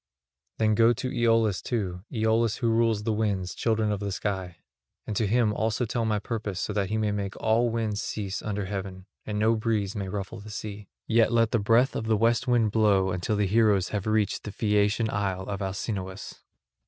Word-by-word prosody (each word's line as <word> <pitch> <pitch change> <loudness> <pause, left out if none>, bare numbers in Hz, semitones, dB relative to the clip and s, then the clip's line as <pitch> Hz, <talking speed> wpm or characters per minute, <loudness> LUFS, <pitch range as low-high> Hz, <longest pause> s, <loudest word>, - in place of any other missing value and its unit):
Then 110 -1 +2
go 115 +2 +5
to 130 +2 -4
Aeolus 115 -4 +2
too, 95 -7 -3
Aeolus 110 -1 +1
who 115 -3 +1
rules 115 -2 +2
the 110 0 0
winds, 100 -5 -1
children 110 -2 0
of 105 - -1
the 100 - -4
clear 100 - -2
sky; 95 -4 -3 0.5
and 110 - -4
to 110 0 +1
him 110 0 +2
also 110 +3 0
tell 115 0 -1
my 110 -1 +1
purpose 105 -3 -4
so 105 - -2
that 100 -2 -1
he 110 - 0
may 105 -1 0
make 100 -1 -3
all 115 +2 +2
winds 110 -2 -1
cease 100 -2 -4
under 105 -2 -3
heaven 95 -1 -5 0.2
and 105 -1 -2
no 110 +2 +3
breeze 110 -2 -1
may 100 -2 -3
ruffle 100 +3 -5
the 105 +1 -10
sea; 105 -1 -7 0.2
yet 115 0 +3
let 115 -1 +3
the 115 - +2
breath 115 +6 +3
of 110 - -2
the 110 -1 +3
west 115 +3 +2
wind 120 -4 +3
blow 100 -4 +3
until 90 +4 -1
the 105 0 +1
heroes 105 -2 +3
have 105 -1 -3
reached 110 -1 +1
the 105 - -6
Phaeacian 105 +1 +1
isle 95 -2 -1
of 100 +1 -5
Alcinous." 95 0 -5
105 Hz, 205 wpm, -27 LUFS, 100-115 Hz, 0.5 s, go